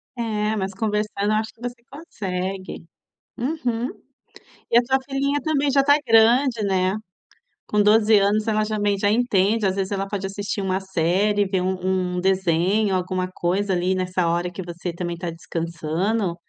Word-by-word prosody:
É, 215 -2 -1
mas 195 -2 -3
conversando 210 0 -1
eu - - +2
acho 220 +1 -1
que 230 - -26
você 240 -1 -6
consegue. 190 - -5 0.5
Uhum. 245 -3 -2 0.8
E 235 - +6
a - - +7
tua 265 +2 +2
filhinha 280 +1 -1
também 290 -3 +1
já 275 0 +4
está 285 +1 +5
grande, 230 +1 +4
né. 190 -1 +1 0.7
Com 210 0 +2
12 215 +1 +5
anos, 205 +2 +1
ela 215 -1 +2
já 215 0 -2
também 205 -1 +1
já 205 +1 +1
entende, 215 -2 +2
às 190 0 +1
vezes 195 0 -2
,ela 195 0 -1
pode 195 -1 -3
assistir 200 +1 -4
uma 190 -1 -1
série, 190 +3 +1
ver 190 -1 -1
um 185 -1 -1
um - - 0
desenho, 190 +2 +2
alguma 185 0 -1
coisa 190 +3 -1
ali 180 +1 +1
nessa 180 -1 0
hora 175 +1 0
que 190 - -6
você 175 0 -5
também 175 0 -4
está 170 0 -4
descansando. 170 +4 -2
200 Hz, 170 wpm, -23 LUFS, 185-220 Hz, 0.8 s, a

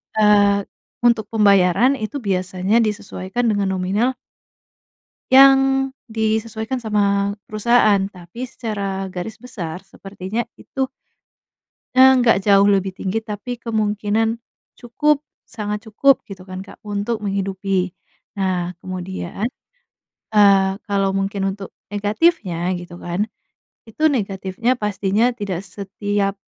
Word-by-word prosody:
eee, 205 -1 +4 0.4
untuk 235 -2 +3
pembayaran, 205 +4 +4
itu 215 +6 -5
biasanya 185 +2 +1
disesuaikan 210 0 -2
dengan 205 -2 0
nominal 205 +8 0 1.2
yang 270 0 +6 0.2
disesuaikan 220 +1 -2
sama 200 -2 +1 0.2
perusahaan, 215 0 +4 0.2
tapi, 180 +7 -8
secara 200 -6 -4
garis 185 +4 -7
besar, 180 -9 -6
sepertinya 195 +3 -5 0.2
itu 270 - -2 1.1
ya, 260 - +8 0.2
nggak 240 -2 +4
jauh 200 -1 +6
lebih 195 0 0
tinggi, 195 +3 -1
tapi, 215 +3 -5
kemungkinan 220 0 -1 0.3
cukup, 285 +5 0 0.2
sangat 210 0 -5
cukup 265 +5 +3
gitu 195 -3 -10
kan, 185 0 -8
Kak, 200 - -15
untuk 210 +1 -3
menghidupi. 195 -2 -1 0.4
Nah, 185 -2 -1
kemudian, 185 +2 -4 0.8
eee, 200 -2 +5
kalau 200 -2 +1
mungkin 195 0 -1
untuk 195 0 -7 0.2
negatifnya, 205 - 0
gitu 175 0 -10
kan, 175 +4 -1 0.6
itu 305 +8 +1
negatifnya, 200 -2 -1
pastinya 210 +1 0
tidak 195 -6 -3
setiap 200 +1 -2
205 Hz, 105 wpm, -20 LUFS, 195-225 Hz, 1.2 s, ya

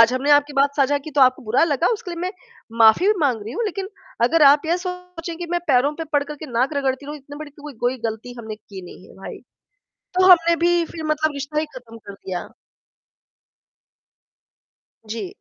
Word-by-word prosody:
आज 230 +1 +6
हमने 265 +3 0
आपकी 290 0 +4
बात 280 0 +2
साझा 285 0 +2
की - - -5
तो 290 -1 0
आपको 255 -1 +4
बुरा 230 +2 +1
लगा, 320 +1 0
उसके 410 -5 -5
लिए 340 -1 -6
मैं 365 +1 -2 0.5
माफ़ी 225 - +6
भी 420 - +5
माँग 260 -7 +1
रही 220 - -7
हूँ 470 - -2
लेक़िन 390 -2 -4 0.4
अगर 320 +6 +3
आप 290 +3 +5
ये 335 +2 +2
सोचें 360 -2 -7
कि 345 +1 -6
मैं 350 0 0
पैरों 270 +1 +3
पे 325 - -4
पड़कर 290 0 0
के 310 - -9
नाक 255 +5 0
रगड़ती 270 0 -1
रहूँ, 295 +1 -6
इतनी 285 +1 -12
बड़ी 305 -1 -8
कोई 295 0 -8
कोई 245 +2 0
ग़लती 220 +3 -7
हमने 220 -2 -6
की 195 -3 -11
नहीं 185 +1 -13
है - - -16
भाई। 195 - -9 0.8
तो 370 0 +3
हमने 340 -2 +6
भी 345 0 +2
फ़िर 320 -1 -8
मतलब 310 0 0
रिश्ता 280 +2 -4
ही 315 - -3
ख़त्म 240 -3 -11
कर 205 -2 -11
दिया। 185 -3 -6 2.6
जी। 225 - -5
290 Hz, 205 wpm, -21 LUFS, 245-335 Hz, 2.6 s, आज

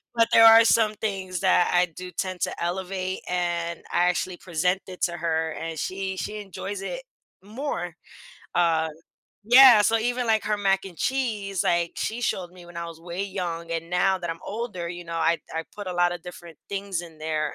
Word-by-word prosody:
But, 230 -1 +4
there 225 - +8
are 225 0 +9
some 220 -2 +3
things 190 -4 -3
that 185 -2 +3
I 175 0 +5
do 180 +2 -10
tend 185 0 -4
to - - -2
elevate 185 +1 -3
and 170 -1 -1
I 175 - +3
actually 180 +1 -2
present 180 +2 0
it 185 -1 -10
to 175 - +1
her 160 -1 -1
and 165 0 -5
she 190 +2 -3
she 210 +2 -4
enjoys 200 0 -6
it - - -5 0.4
more, 205 - -4 0.6
uh 165 -2 +2 0.6
yeah, 245 0 +9
so 225 +2 +3
even, 245 +2 -1
like, 220 -1 +2
her 210 -1 0
mac 195 -1 +2
and 185 -4 -10
cheese, 215 -8 -1
like, 170 -1 +1
she 230 +2 -3
showed 185 -6 -2
me 180 -1 -14
when 175 0 -12
I 170 - -3
was 165 -1 -10
way 175 +3 -4
young 175 -4 -4
and 165 0 -3
now 185 +2 +2
that 175 -1 -5
I'm 165 0 -4
older, 205 -5 -4
you 175 0 -7
know, 170 0 -6
I 165 +1 +2 0.2
I 160 0 -2
put 205 -1 -7
a 185 - -3
lotta 175 0 +2
different 170 -1 -11
things 195 -3 -3
in 165 -2 -13
there 155 -1 -2
180 Hz, 200 wpm, -25 LUFS, 170-205 Hz, 0.6 s, are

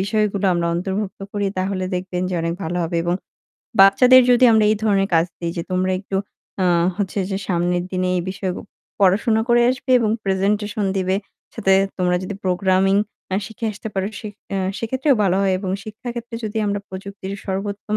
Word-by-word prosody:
বিষয়গুলো 200 0 0
আমরা 170 0 0
অন্তর্ভুক্ত 190 +3 -3
করি 205 -1 -1
তাহলে 185 0 -1
দেখবেন 180 0 -3
যে - - -2
অনেক 165 0 -1
ভালো 170 +2 -3
হবে 170 +1 -2
এবং 175 0 +1 0.7
বাচ্চাদের 250 +7 +7
যদি 245 +1 +5
আমরা 220 -1 +4
এই 215 - +2
ধরনের 195 -2 +2
কাজ 165 0 +5
দিই 170 -1 -3
যে, 170 - -2
তোমরা 185 0 +1
একটু 195 -1 -4 0.5
আ - - +3 0.3
হচ্ছে 200 -1 -2
যে 195 - -1
সামনের 175 0 0
দিনে 185 0 0
এই - - -1
বিষয় 190 -1 -3 0.5
পড়াশোনা 215 +4 +3
করে 240 0 +5
আসবে 255 0 -4
এবং 220 -2 +1
প্রেজেন্টেশন 205 +2 0
দিবে। 185 0 +1 0.4
সাথে 200 -4 +2 0.3
তোমরা 180 -1 +2
যদি 190 +2 -5
প্রোগ্রামিং 190 +1 +2 0.4
এহ 195 - +1
শিখে 225 +2 -5
আসতে 210 +2 -7
পারো 195 0 0
সে 215 - -6 0.5
সেক্ষেত্রেও 260 +5 +1
ভালো 190 -2 +2
হয় 195 -1 +2
এবং 190 -1 -4
শিক্ষা 220 +3 -8
ক্ষেত্রে 235 0 -7
যদি 215 +1 -5
আমরা 205 0 0
প্রযুক্তির 195 0 -7
সর্বোত্তম 200 +2 -3
195 Hz, 175 wpm, -21 LUFS, 185-215 Hz, 0.7 s, বাচ্চাদের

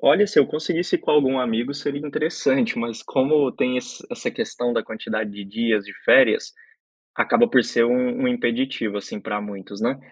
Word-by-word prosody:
Olha, 210 - +5
se 205 - +1
eu - - +7
conseguisse 165 +3 -1
com - - -3
algum 135 -3 +3
amigo, 125 +2 -1
seria 145 +1 -4
interessante. 175 - 0
Mas 115 -1 -4
como 140 +1 +2
tem 125 0 0
esse 125 - -6
essa - - -4
questão 120 0 -3
da - - 0
quantidade 110 -1 -4
de 100 0 -9
dias 110 0 0
de 100 - -10
férias, 265 - +5 0.6
acaba 240 -1 +3
por 125 - +4
ser 115 +1 +2
um 125 - 0
um - - +3
impeditivo, 130 - -1
assim, 100 - -7
para 105 -1 -4
muitos, 100 -1 -9
né? 135 - 0
125 Hz, 185 wpm, -22 LUFS, 110-150 Hz, 0.6 s, eu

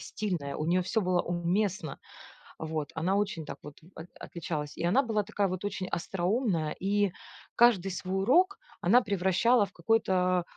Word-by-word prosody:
стильная, 175 -10 -4
у 155 - -3
нее 180 +2 +2
все 205 +5 0
было 180 -2 +1
уместно. 175 -1 -1 0.6
Вот. 155 -2 -4
Она 180 +5 0
очень 200 -6 -1
так - - -7
вот 145 -1 -11 0.2
от 160 - -9
отличалась, 155 -3 -5
и - - -4
она 230 +11 +3
была 215 -3 0
такая 205 -1 -1
вот 185 +1 -4
очень 190 -2 -3
остроумная, 180 -2 -1
и 200 0 +1 0.4
каждый 200 -6 +4
свой 185 +2 -2
урок 365 - +3 0.2
она 230 +8 +5
превращала 200 +3 +2
в - - -15
какой-то, 185 -2 +1
185 Hz, 160 wpm, -29 LUFS, 170-210 Hz, 0.6 s, она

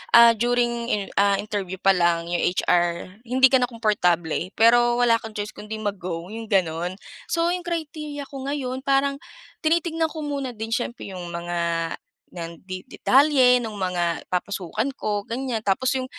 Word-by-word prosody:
ah, 235 0 +9
during 235 +1 0
iner 205 -4 -1
ah, 200 0 +4
interview 200 -2 -3
pa 195 - +5
lang, 170 -2 +1
yung 175 - +1
HR 175 +1 0
hindi 260 +2 +5
ka 260 - +5
na 245 - +1
komportable. 180 -7 0
Pero 240 +1 +5
wala 230 -1 +4
kang 220 -1 -10
choice 205 0 -4
kung 210 - -11
'di 220 - -4
mag-go, 180 -3 -4
yung 225 0 -6
gano'n. 180 -3 0 0.3
So 335 +1 +1
yung 360 -1 -3
criteria 305 -3 -4
ko 270 -1 -8
ngayon, 265 -2 -3
parang 275 0 +2 0.4
tinitignan 325 0 +1
ko 315 -1 -7
muna 275 -4 -3
din 220 +1 -6
siyempre 235 -3 -3
yung 180 -2 -7
mga, 170 -1 -2 0.4
nan 170 -2 -8
di 185 -1 -7
detalye 265 -1 +4
no'ng 225 -3 -4
mga 180 -4 -1
papasukan 190 - -2
ko 205 -3 -3
ganyan, 235 -2 -3
tapos 250 +7 +1
yung 255 - -2
220 Hz, 165 wpm, -24 LUFS, 180-260 Hz, 0.4 s, ah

